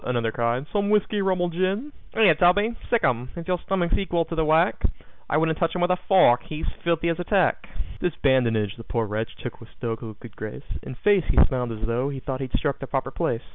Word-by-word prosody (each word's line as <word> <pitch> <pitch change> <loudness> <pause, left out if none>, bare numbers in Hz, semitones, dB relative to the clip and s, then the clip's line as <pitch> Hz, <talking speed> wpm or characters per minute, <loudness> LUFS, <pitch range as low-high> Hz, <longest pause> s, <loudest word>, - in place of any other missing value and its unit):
another 120 -2 0
cried. 120 +3 -1
"Some 200 -1 +1
whiskey, 210 0 +2
rum 190 -2 +1
or 175 0 0
gin?" 190 - -1 0.2
"Here, 215 -6 +6
Toby, 205 +8 +3
sic 235 - +2
'em, 125 +1 +1
if 170 -1 -7
your 180 -1 0
stomach's 180 -3 0
equal 175 -4 0
to 165 - -7
the 160 - +1
work 155 +2 +3 0.5
I - - +2
wouldn't 160 0 +1
touch 165 - 0
him 180 - -1
with 175 +1 +3
a - - +4
fork, 180 -11 +6
he's 155 0 -5 0.2
filthy 170 0 +1
as 165 - -1
a - - -1
Turk." 190 -1 +1 0.3
This 175 - -1
badinage 115 -6 +2
the 115 - -9
poor 115 -1 -1
wretch 110 +2 -3
took - - -7
with - - -13
stoical 115 -1 -4
good 110 0 -13
grace; 110 +5 -7 0.2
In 130 - -8
face, 200 +5 +3
he - - 0
smiled 125 -4 -2
as 110 -1 -6
tho' 120 +4 0
he 140 -2 -5
thought 130 0 -4
he'd 130 -2 -4
struck 140 -2 -1
the 135 - -6
proper 135 0 -2
place. 115 -2 -1
155 Hz, 235 wpm, -25 LUFS, 120-180 Hz, 0.5 s, Here